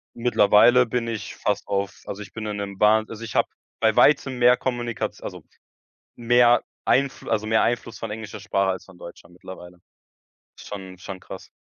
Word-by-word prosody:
Mittlerweile 120 +1 +5
bin 115 0 -2
ich 115 -2 -5
fast 105 -1 -2
auf 100 0 -3
also 105 +1 -6
ich - - -12
bin 110 -1 -6
in 105 -1 -3
'nem 100 -1 -6
Bahn 110 +1 +4
also, 115 0 -9
ich 110 - -7
habe - - +2 0.3
bei 110 -1 +3
Weitem 135 -3 +4
mehr 125 0 +6
Kommunikation 120 -3 -4
also - - -7 0.7
mehr 120 0 +4 0.2
Einflu 140 0 0
also 110 0 0
mehr 110 0 +3
Einfluss 115 -1 -2
von 115 - -6
englischer 110 -1 -7
Sprache 100 -1 0
als 95 - -5
von 95 -2 -17
deutscher 85 - -12
mittlerweile. 90 0 -12 0.8
Schon 95 -2 -9
schon 95 0 -8
krass. - - -11
110 Hz, 175 wpm, -23 LUFS, 100-120 Hz, 0.8 s, mehr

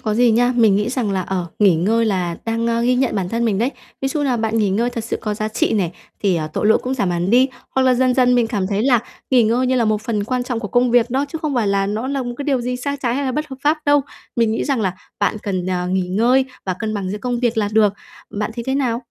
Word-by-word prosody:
có 215 -1 -1
gì 240 +1 +4
nha. 245 +3 +3
Mình 220 -4 +5
nghĩ 210 +2 0
rằng 245 -4 -1
là, 190 - 0
ờ, 180 -1 -3
nghỉ 200 -4 +5
ngơi 220 +8 +2
là 180 -5 -1
đang, 230 0 -1
ơ, 230 0 +1
ghi 250 +1 +3
nhận 255 0 +1
bản 190 -3 -1
thân 230 +3 -1
mình 210 -4 +1
đấy. 240 +5 +1 0.3
Ví 270 - 0
dụ 295 +3 -2
như 290 - 0
là 255 -2 +1
bạn 225 0 0
nghỉ 210 -3 +2
ngơi 235 +5 +1
thật 230 -3 -5
sự 225 - -2
có 210 -1 -2
giá 215 +1 -2
trị 220 - 0
này, 190 -6 0 0.3
thì, 195 -4 +2
ờ, 155 -2 -2
tội - - 0
lỗi 220 - +5
cũng 255 +1 -2
giảm 200 -8 0
hẳn 175 +2 -1
đi. 255 +3 +5 0.3
Hoặc 265 - +3
là 255 -1 +4
dần 255 0 +2
dần 250 -1 +4
mình 240 -2 +3
cảm 205 -5 -1
thấy 200 +1 -1
là 250 -1 +4 0.3
nghỉ 255 -3 +5
ngơi 235 +4 +2
như 260 - +1
là 235 - +2
một 215 -1 0
phần 215 -2 -1
quan 250 +3 -1
trọng 245 -2 -3
của 210 - -5
công 245 +2 +2
việc 240 0 +3
đó, 270 +3 +1
chứ 320 - -5
không 300 -3 -1
phải 235 -4 +1
là 195 0 +1
nó 215 +5 -2
là 275 -1 -1
một 245 -1 -5
cái 285 - -4
điều 275 -3 +1
gì 250 +1 -2
sai 280 +3 -3
trái 240 -2 0
hay 280 +2 -1
là 260 - -1
bất 300 +3 -2
hợp 265 - -7
pháp 305 +2 +3
đâu. 290 0 +5 0.4
Mình 230 -2 +2
nghĩ 225 - -1
rằng 275 -5 0
là 190 -4 0 0.3
bạn 205 +1 +1
cần, 185 -3 -2
ờ, 180 -1 -1
nghỉ 185 -1 0
ngơi 240 +8 +3 0.2
và 185 - 0
cân 220 -1 -3
bằng 195 -3 -3
giữa 210 - -4
công 245 0 -2
việc 240 -2 0
là 205 -2 +1
được, 210 -2 +4 0.4
bạn 210 +2 -3
thấy 235 -1 -5
thế 265 - 0
nào? 250 -3 0
230 Hz, 310 wpm, -19 LUFS, 205-250 Hz, 0.4 s, Mình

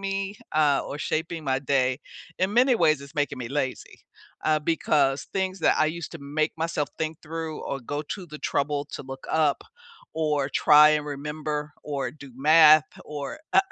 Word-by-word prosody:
me, 195 +1 -3
uh, 150 -3 +3
or 145 - -5
shaping 160 +1 -3
my 130 -1 +1
day, 130 -1 +1 0.4
in 190 +3 0
many 250 +1 +5
ways, 155 -9 +3
it's 140 +3 -13
making 145 -2 -1
me 120 -2 -5
lazy. 135 -2 -4 0.4
Uh, 155 0 +3
because 145 -3 +1
things 190 0 -1
that - - +3
I 155 - +3
used 170 +2 -5
to 165 - -7
make 150 +3 -1
myself 160 -2 -1
think 160 0 -3
through 160 0 -5
or 135 - -4
go 145 +4 -4
to 185 +5 -6
the 150 -1 -9
trouble 145 0 -1
to - - -6
look 135 0 -9
up 155 -3 +2 0.5
or 150 -3 0
try 150 +1 +6
and 150 -1 +1
remember 150 +1 -4
or 140 -4 -3
do 140 -1 -13
math 155 +1 +7 0.2
or, 145 - -6
uh, - - +7
150 Hz, 180 wpm, -25 LUFS, 140-160 Hz, 0.5 s, math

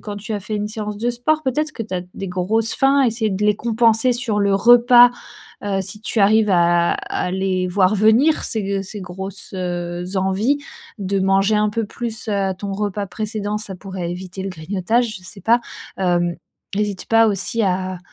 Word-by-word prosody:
quand 205 -1 -6
tu 210 +2 -6
as 205 - -2
fait 210 +2 -4
une 210 0 -2
séance 210 -1 -5
de 240 +2 0
sport 305 +6 0
peut-être, 305 +3 -1
que 230 - -5
tu 205 -4 -6
as 180 - -1
des 195 - -5
grosses 205 +5 0
faim? 275 +1 +3
Essayer 225 -2 0
de 195 +2 -1
les 210 0 +4
compenser 230 +2 +2
sur 230 -4 -1
le 200 -1 +2
repas, 240 +3 +7 0.5
heu, 195 -1 0
si 210 +3 -8
tu 225 - -3
arrives 210 +1 +4
à 175 -1 +3
à - - -3
les 185 -1 -1
voir 185 +2 +2
venir 220 +9 +4
ces 220 -3 -1
g 195 0 -1
ces 200 +2 -8
grosses, 190 +1 -8
heu, 175 -1 -3
envies. 190 +9 +1 0.4
De 195 0 -1
manger 195 +2 +3
un 210 0 +2
peu 225 +1 -1
plus, 225 0 -6
heu, 200 -2 0
ton 200 0 -4
repas 205 0 -2
précédent, 210 0 -3
ça 205 -3 -6
pourrait 185 -2 -5
éviter 185 +1 -6
le 195 - -3
grignotage, 200 +7 -1
je 180 - -19
sais 195 - -10
pas. 235 +3 +3 0.4
Hem, 175 -2 +1 0.4
n'hésite 205 -2 -2
pas 225 0 +5
aussi 205 +3 -1
à 185 -1 -1
205 Hz, 195 wpm, -20 LUFS, 190-225 Hz, 0.5 s, repas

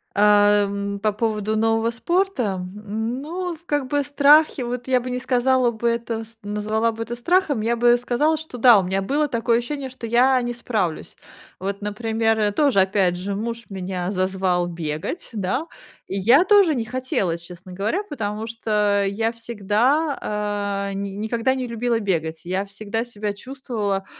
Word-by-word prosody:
Э, 205 0 +5
м, 200 0 -3
по 215 0 +1
поводу 215 0 -1
нового 225 +1 +2
спорта. 265 - 0 0.3
Ну, 280 - -3
в 315 - -21
как 290 -3 0
бы 290 0 0
страхи, 290 0 +4
вот 245 +1 -4
я 255 -1 +3
бы 250 +1 -5
не 250 - -2
сказала 255 0 +2
бы, 235 +1 -2
это 230 -1 -2
с 225 +1 -11
назвала 215 +2 -1
бы 225 0 -5
это 240 +1 -5
страхом, 295 - +1
я 235 +2 +1
бы 240 +1 +5
сказала, 245 +6 +1
что 315 -5 -8
да, 240 -3 +7
у 190 - 0
меня 190 +2 -1
было 295 +7 +1
такое 235 -2 +1
ощущение, 270 +2 -5
что 255 -2 -8
я 250 +3 +4
не 240 0 -2
справлюсь. 210 -9 -2 0.4
Вот, 200 +2 -4
например, 220 0 0
то 290 +3 +3
же, 200 - +3
опять 190 -2 +1
же, 195 +2 -3
муж 230 +3 -4
меня 185 -2 -4
зазвал 185 -2 0
бегать, 165 - -4
да. 220 - -2 0.4
И 195 - -3
я 245 - +6
тоже 395 -4 +5
не 235 -5 -2
хотела, 250 - -1
честно 180 +2 -12
говоря, 205 - -1
потому 220 - -4
что 210 -3 +1
я 225 +3 0
всегда, 210 -3 -1
э, - - -5
ни 200 0 -3
никогда 225 +5 -1
не 260 -1 -3
любила 235 0 -1
бегать, 160 -5 -2
я 185 +3 -1
всегда 215 +3 -4
себя 210 -3 -4
чувствовала, 210 -5 -4
225 Hz, 170 wpm, -22 LUFS, 200-255 Hz, 0.4 s, да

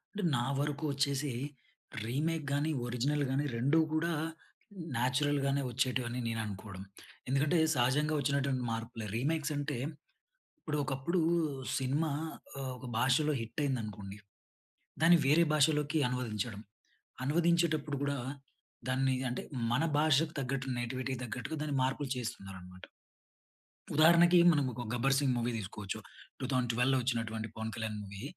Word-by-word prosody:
అంటే, 205 - -2
నా 120 - +1
వరకు 145 +1 -1
వచ్చేసి, 140 +1 0 0.8
రీమేక్ 155 +6 -1
గాని, 145 +3 +1 0.2
ఒరిజినల్ 140 +5 0
గాని 140 +2 +1
2 140 +7 +3 0.2
కూడా, 165 +2 +1 0.8
నాచురల్‍గానే 140 +2 +1
వచ్చేటివి 125 0 0
అని 125 +1 -3
నేను 115 -1 -1
అనుకోవడం. 100 -1 -7 0.5
ఎందుకంటే, 145 +6 +2 0.2
సహజంగా 140 +5 +2
వచ్చినటువంటి 140 -2 0
మార్పులే. 115 -1 -4
రీమేక్స్ 155 +3 0
అంటే, 145 -2 -2 0.8
ఇప్పుడు, 150 -1 -3
ఒకప్పుడు 135 +7 0 0.6
సినిమా, 145 +4 0 0.7
ఒక 130 - -10
భాషలో 135 +5 +3
హిట్ 115 +5 -4
అయిందనుకోండి, 105 -6 -3 0.9
దాన్ని 170 +1 +8
వేరే 165 +4 +5
భాషలోకి 150 0 +3
అనువదించడం. 115 -4 -3 0.6
అనువదించేటప్పుడు 160 -1 +2
కూడా, 140 0 -1 0.7
దాన్ని 130 0 +2 0.2
అంటే 125 - -3 0.3
మన 130 +7 +2
భాషకు 155 +1 +3
తగ్గట్టు 130 -1 -2
నేటివిటీకి 130 +1 -3
తగ్గట్టుగా 125 +6 -4
దాన్ని 145 -2 -1
మార్పులు 135 +1 -1
చేస్తున్నారనమాట. 95 -6 -7 1.1
ఉదాహరణకి, 170 +3 +7
మనం 145 -3 +2
ఒక 125 - -5
'గబ్బర్ 135 +3 +2
సింగ్ 135 -2 +2
మూవీ' 120 +1 0
తీసుకోవచ్చు, 100 0 -5 0.4
2012లో 125 0 +1
వచ్చినటువంటి 115 -3 -1
పవన్ 110 0 -4
కళ్యాణ్ 110 -2 -3
మూవీ. 100 0 -8
135 Hz, 120 wpm, -32 LUFS, 120-150 Hz, 1.1 s, దాన్ని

